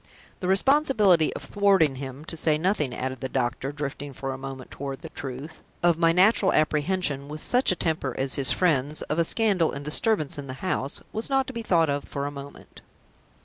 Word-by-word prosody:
The 180 - -3
responsibility 205 - +3
of - - -6
thwarting 195 -9 +2
him 135 +2 -7
to 165 - -3
say 155 -1 +2
nothing," 160 -5 0
added 130 +1 -4
the 130 - -3
doctor, 130 +1 -2
drifting 145 -1 -5
for 135 +1 -4
a - - -5
moment 135 -1 -8
toward 135 -1 -6
the - - -7
truth, 135 +4 -8 0.2
"of 170 -1 +3
my 165 -1 +4
natural 190 +2 +4
apprehension, 155 -2 0
with 155 +1 -7
such 250 -3 +4
a - - +1
temper 160 -7 -2
as 135 0 0
his 135 -2 +4
friend's, 150 -4 +1
of 150 - -2
a - - +4
scandal 195 -3 +1
and 140 +1 -7
disturbance 155 -1 0
in 140 - -7
the 130 - -6
house 140 -6 -2
was 220 +4 -3
not 270 -1 +2
to 265 - -8
be 230 - -4
thought 170 -7 +2
of 140 0 -2
for 140 0 -4
a 145 - -3
moment. 140 0 -11
155 Hz, 205 wpm, -25 LUFS, 140-185 Hz, 0.2 s, my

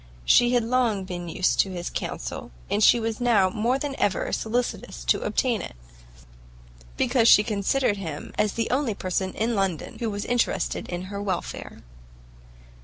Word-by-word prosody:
She 240 - +5
had 240 - +3
long 230 -4 +1
been 175 -2 -6
used 180 +3 +1
to 195 - +4
his 175 -2 -5
counsel, - - -5 0.2
and 210 - +2
she 240 - +6
was 225 0 -3
now 210 -6 +3
more 230 +6 +1
than 280 0 -3
ever 200 - 0
solicitous 240 +2 -2
to - - +2
obtain 240 -7 0
it, - - -8 1.2
because 235 -3 +3
she 210 - +8
considered 210 +2 0
him 160 -6 -6
as 210 -2 +1
the 230 -1 -2
only 255 -5 0
person 190 0 -2
in 230 +2 0
London 195 -6 -2
who 230 -2 -1
was 205 -1 -4
interested 245 -1 -1
in 175 0 -4
her 200 - -3
welfare. 190 -4 -4
210 Hz, 165 wpm, -25 LUFS, 190-240 Hz, 1.2 s, she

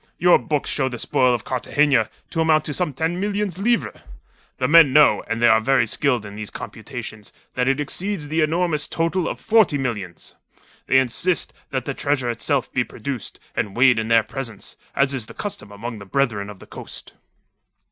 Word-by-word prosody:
Your 175 0 +5
books 150 -2 -2
show 135 -2 0
the 120 - -6
spoil 125 +2 +2
of 120 -3 -1
Cartagena 130 -1 +1 0.2
to 165 - 0
amount 155 -1 +3
to 150 - -3
some 175 0 -1
ten 165 +6 -2
million 205 +1 -1
livres. 220 +7 -1 0.6
The 130 - 0
men 155 -3 +7
know 150 0 +6
and 115 0 -2
they 120 - +5
are 110 -1 +5
very 130 +1 +3
skilled 120 0 0
in 100 0 -9
these 105 -1 -6
computations 105 -2 -8 0.2
that 125 0 0
it 135 +1 +1
exceeds 175 +3 -3
the 160 +2 0
enormous 160 -1 +1
total 165 +2 -1
of - - -4
forty 220 -9 +3
millions. 105 - -5 0.5
They 130 - +4
insist 130 +8 +1 0.2
that 130 -2 -3
the 140 - -2
treasure 135 -4 0
itself 130 +3 -1
be 125 - +2
produced 120 +1 -6 0.2
and 100 +1 -2
weighed 125 -2 +5
in 110 - -2
their 115 -1 +4
presence, 120 -6 -7 0.2
as 140 0 +2
is 120 -5 -3
the - - -12
custom 145 - -6
among 110 +2 -7
the 100 - -10
Brethren 105 -3 -1
of 105 - -10
the - - -14
Coast." - - -9
135 Hz, 190 wpm, -22 LUFS, 115-160 Hz, 0.6 s, men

